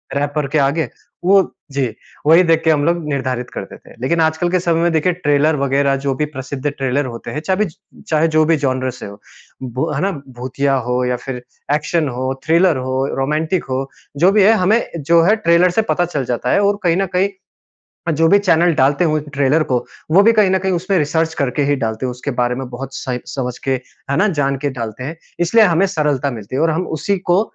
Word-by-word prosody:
Wrapper 145 Hz, 0 st, -1 dB
के 155 Hz, +3 st, -1 dB
आगे 140 Hz, +1 st, +1 dB, 0.4 s
वो 195 Hz, +1 st, +6 dB, 0.3 s
जी, 135 Hz, -2 st, 0 dB, 0.4 s
वही 165 Hz, +3 st, +7 dB
देख 165 Hz, -1 st, +2 dB
के 160 Hz, -, +4 dB
हम 145 Hz, -1 st, +1 dB
लोग 170 Hz, -1 st, +1 dB
निर्धारित 130 Hz, -3 st, -2 dB
करते -, -, -7 dB
थे। -, -, -17 dB
लेकिन 165 Hz, +5 st, +1 dB
आजकल 160 Hz, +2 st, +1 dB
के 185 Hz, -, +2 dB
समय 170 Hz, -1 st, +1 dB
में 170 Hz, 0 st, +2 dB
देखिए 170 Hz, +3 st, +2 dB
ट्रेलर 150 Hz, -2 st, +2 dB
वगैरह 140 Hz, 0 st, +1 dB
जो 135 Hz, -1 st, 0 dB
भी 150 Hz, -, 0 dB
प्रसिद्ध 135 Hz, -1 st, -5 dB
ट्रेलर 135 Hz, 0 st, -1 dB
होते 115 Hz, -2 st, -7 dB
हैं, 150 Hz, -, -3 dB
चा 185 Hz, +4 st, 0 dB
बिज 195 Hz, -5 st, -2 dB, 0.3 s
चाहे 160 Hz, +1 st, +2 dB
जो 155 Hz, 0 st, +3 dB
भी 165 Hz, -1 st, +3 dB
जॉनर 130 Hz, -1 st, 0 dB
से 125 Hz, -, -10 dB
हो, 100 Hz, 0 st, -10 dB, 0.4 s
ब 130 Hz, +4 st, -3 dB
है 140 Hz, -, -1 dB
ना? 195 Hz, +1 st, +1 dB, 0.2 s
भूतिया 130 Hz, +2 st, -2 dB
हो 125 Hz, 0 st, +1 dB
या 125 Hz, 0 st, 0 dB
फिर 125 Hz, -2 st, -5 dB, 0.3 s
एक्शन 155 Hz, 0 st, 0 dB
हो, 130 Hz, +2 st, -2 dB
थ्रिलर 165 Hz, -1 st, +3 dB
हो, 130 Hz, +1 st, -1 dB
रोमांटिक 155 Hz, +6 st, 0 dB
हो, 135 Hz, +1 st, -2 dB, 0.3 s
जो 180 Hz, +5 st, +5 dB
भी 205 Hz, -1 st, +4 dB
है 220 Hz, +3 st, +6 dB
हमें 220 Hz, +4 st, +3 dB, 0.2 s
जो 165 Hz, +3 st, +4 dB
है 210 Hz, +5 st, +4 dB
ट्रेलर 175 Hz, -3 st, +3 dB
से 225 Hz, -, +2 dB
पता 175 Hz, -, +1 dB
चल 145 Hz, -7 st, -3 dB
जाता 125 Hz, +1 st, -1 dB
है -, -, +3 dB
और 200 Hz, 0 st, +1 dB
कहीं 170 Hz, 0 st, +2 dB
न 195 Hz, -, +1 dB
कहीं 195 Hz, +2 st, +2 dB, 0.8 s
अ, -, -, +3 dB
जो 165 Hz, +2 st, +2 dB
भी 200 Hz, -, +6 dB
चैनल 175 Hz, -3 st, +3 dB
डालते 140 Hz, +5 st, +2 dB
हुए 155 Hz, -1 st, +1 dB
ट्रेलर 140 Hz, +3 st, +2 dB
को, 125 Hz, -, 0 dB, 0.3 s
वो 190 Hz, +5 st, +6 dB
भी 230 Hz, +2 st, +5 dB
कहीं 210 Hz, -4 st, +3 dB
न 190 Hz, -, +3 dB
कहीं 190 Hz, +1 st, -1 dB
उसमें 185 Hz, +2 st, 0 dB
रिसर्च 160 Hz, +2 st, 0 dB
करके 140 Hz, +1 st, -1 dB
ही -, -, +4 dB
डालते 110 Hz, +1 st, -2 dB
हैं, -, -, -2 dB
उसके 125 Hz, +3 st, -5 dB
बारे 120 Hz, 0 st, +1 dB
में 130 Hz, -1 st, -5 dB
बहुत 135 Hz, +2 st, -7 dB
सही 125 Hz, -2 st, -3 dB
समझ 125 Hz, -2 st, -4 dB
के, 135 Hz, -, +2 dB, 0.4 s
है 140 Hz, -, +1 dB
ना? 210 Hz, +2 st, +3 dB
जान 145 Hz, -5 st, 0 dB
के 145 Hz, -, 0 dB
डालते 115 Hz, -1 st, -6 dB
हैं। 160 Hz, +4 st, -5 dB, 0.2 s
इसलिए 215 Hz, +6 st, +5 dB
हमें 180 Hz, +1 st, +3 dB
सरलता 150 Hz, -6 st, 0 dB
मिलती 110 Hz, +2 st, -6 dB
है 140 Hz, -, +1 dB
और 165 Hz, -, +3 dB
हम 175 Hz, +3 st, -1 dB
उसी 190 Hz, +7 st, -1 dB
को 180 Hz, +1 st, +2 dB
150 Hz, 230 wpm, -18 LUFS, 130-175 Hz, 0.8 s, वही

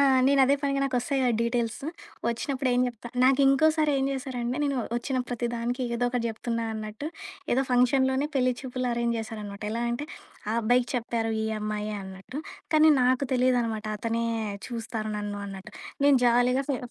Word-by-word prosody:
ఆ! -, -, +6 dB, 0.2 s
నేనదే 275 Hz, 0 st, +5 dB
పనిగా 275 Hz, -1 st, +1 dB
నాకొస్తాయి 270 Hz, +1 st, 0 dB
గదా! 250 Hz, -, +3 dB
డీటెయిల్స్ 235 Hz, -1 st, 0 dB, 0.5 s
ఒచ్చినప్పుడు 255 Hz, +3 st, -1 dB
ఏం 245 Hz, -, +3 dB
జెప్తా 240 Hz, -1 st, -6 dB, 0.2 s
నాకు 270 Hz, +1 st, +5 dB
ఇంకోసారి 310 Hz, +3 st, +4 dB
ఏం 270 Hz, -, +1 dB
జేశారంటే, 255 Hz, -2 st, -3 dB
నేను 280 Hz, -1 st, 0 dB, 0.2 s
ఒచ్చిన 255 Hz, +2 st, -1 dB
ప్రతి 240 Hz, -1 st, -2 dB
దానికి 240 Hz, +2 st, -2 dB
ఏదో 240 Hz, +1 st, 0 dB
ఒకటి 245 Hz, -1 st, -1 dB
జెప్తున్నా 230 Hz, +1 st, -3 dB
అన్నట్టు, 215 Hz, +5 st, -5 dB, 0.5 s
ఏదో 265 Hz, +2 st, +3 dB
ఫంక్షన్‌లోనే 260 Hz, +2 st, +3 dB
పెళ్ళి 255 Hz, -2 st, +3 dB
చూపులు 255 Hz, -1 st, -3 dB
అరేంజ్ 235 Hz, 0 st, 0 dB
జేసారనమాట. 215 Hz, -2 st, -6 dB
ఎలా 230 Hz, +2 st, -2 dB
అంటే, 250 Hz, +5 st, -3 dB, 0.4 s
ఆ -, -, +1 dB
అబ్బాయికి 245 Hz, +2 st, +2 dB
చెప్పారు 230 Hz, -2 st, -1 dB
"ఈ -, -, -1 dB
అమ్మాయే" 210 Hz, 0 st, -3 dB
అన్నట్టు, 190 Hz, +9 st, -7 dB, 0.3 s
కానీ, 310 Hz, 0 st, +7 dB
నాకు 255 Hz, +2 st, +3 dB
తెలీదనమాట. 240 Hz, -4 st, +1 dB
అతనే 230 Hz, +2 st, -1 dB, 0.4 s
చూస్తారు 225 Hz, -2 st, -4 dB
నన్ను 205 Hz, 0 st, -4 dB
అన్నట్టు. 195 Hz, -1 st, -9 dB, 0.3 s
నేను 285 Hz, -1 st, +6 dB
జాలీగా 245 Hz, +3 st, +3 dB
ఫే 275 Hz, -, +1 dB
245 Hz, 160 wpm, -27 LUFS, 230-265 Hz, 0.5 s, కానీ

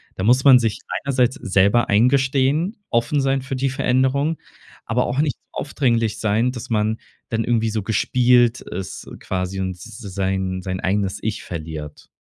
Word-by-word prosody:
da 95 Hz, -, -4 dB
muss 125 Hz, +4 st, +4 dB
man 130 Hz, -3 st, +8 dB
sich 115 Hz, -3 st, -1 dB, 0.3 s
einerseits 130 Hz, -2 st, +2 dB
selber 100 Hz, +5 st, +2 dB
eingestehen, 135 Hz, -, +2 dB
offen 120 Hz, +5 st, +1 dB
sein 135 Hz, 0 st, +1 dB
für 135 Hz, 0 st, -5 dB
die 135 Hz, +1 st, 0 dB
Veränderung, 135 Hz, +3 st, +1 dB, 0.5 s
aber 120 Hz, +3 st, 0 dB
auch 125 Hz, +3 st, -2 dB
nicht 145 Hz, -3 st, 0 dB, 0.2 s
aufdringlich 115 Hz, -6 st, 0 dB
sein, 110 Hz, +3 st, +1 dB
dass 120 Hz, -3 st, -8 dB
man 110 Hz, -1 st, 0 dB, 0.3 s
dann 115 Hz, 0 st, 0 dB
irgendwie 115 Hz, -2 st, +1 dB
so 110 Hz, -1 st, -2 dB
gespielt 120 Hz, +2 st, +3 dB
ist 95 Hz, +1 st, -7 dB
quasi 95 Hz, +1 st, -3 dB
und 95 Hz, -, -2 dB
s 90 Hz, 0 st, -10 dB
s 115 Hz, -3 st, -11 dB, 0.2 s
sein 95 Hz, -1 st, -1 dB
sein 95 Hz, 0 st, -4 dB
eigenes 95 Hz, 0 st, -1 dB
ich 110 Hz, -1 st, -3 dB
verliert. 80 Hz, -3 st, -7 dB
115 Hz, 160 wpm, -21 LUFS, 100-130 Hz, 0.5 s, man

